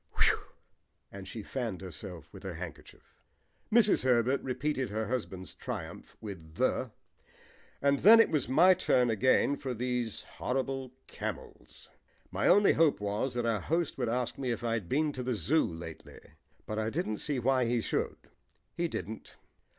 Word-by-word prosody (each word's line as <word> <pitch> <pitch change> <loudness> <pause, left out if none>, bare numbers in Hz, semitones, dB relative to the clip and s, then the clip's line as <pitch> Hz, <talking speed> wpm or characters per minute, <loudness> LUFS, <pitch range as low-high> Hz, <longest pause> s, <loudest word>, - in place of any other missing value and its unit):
Whew!" - - +4 0.7
and 100 -1 -9
she 110 +1 -6
fanned 115 -8 -4
herself 90 -2 -8
with - - -10
her 95 -4 -6
handkerchief. 85 -2 -10 0.6
Mrs. 215 -2 +5
Herbert 125 +1 +3
repeated 130 0 -2
her 110 +1 -2
husband's 100 -7 -4
triumph - - -7
with 85 -7 -9
"the," 130 +2 +1 0.9
and 140 -1 +3
then 225 +4 +9
it 225 - +5
was 150 -6 0
my 170 +8 +7
turn 125 -8 +2
again 130 +5 +3
for 130 -3 -4
these 120 -2 -1
horrible 130 0 -3
camels. - - -7 0.4
My - - 0
only 200 +3 +6
hope 160 -2 +3
was 105 +5 -2
that 120 -1 -1
our 110 -4 +1
host 165 - -1
would 120 -3 0
ask 125 +2 -2
me 130 -2 -2
if 120 -1 -2
I 115 -1 0
had 105 -7 -3
been 150 +2 +2
to 130 - -5
the 125 -1 -1
Zoo 145 - +2
lately, 80 -1 -9 0.5
but 110 0 -3
I 110 0 0
didn't 125 -5 -2
see 145 +3 -2
why 130 +1 +2
he 120 +1 +1
should. - - -2 0.6
He 170 - 0
didn't. 110 -8 -6
125 Hz, 165 wpm, -31 LUFS, 105-135 Hz, 0.9 s, then